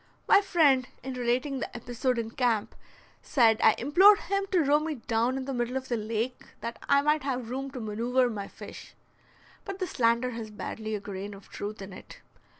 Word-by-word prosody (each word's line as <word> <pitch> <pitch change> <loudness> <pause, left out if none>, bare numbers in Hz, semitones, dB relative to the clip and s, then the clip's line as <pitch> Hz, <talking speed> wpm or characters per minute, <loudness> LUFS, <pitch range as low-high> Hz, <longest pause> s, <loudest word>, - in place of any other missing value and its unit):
My 400 - +7
friend, 290 -10 +3 0.2
in 265 0 -4
relating 250 +3 -1
the - - -5
episode 245 +1 -2
in 225 -1 -3
camp, 235 -4 0 0.5
said 230 -5 +3
I 220 - +6
implored 375 - +6
him 395 0 -1
to 360 -4 +3
row 290 +1 +4
me 310 0 -3
down 235 +1 0
in 265 - -4
the 275 - -3
middle 245 +1 -1
of 265 0 -6
the 240 - +1
lake 225 +3 -2 0.2
that 235 0 -5
I 280 0 +5
might 300 +1 +2
have 255 -4 -3
room 270 +2 -3
to 265 -1 -7
manoeuver 235 +4 +1
my 200 -2 -5
fish. - - -11 0.7
But 390 -1 -6
the 375 - -2
slander 235 -4 +1
has 230 -2 -6
barely 215 +1 -5
a - - -3
grain 200 0 -6
of 195 - -15
truth 205 0 -6
in 195 0 -9
it. - - -12
250 Hz, 200 wpm, -28 LUFS, 225-275 Hz, 0.7 s, My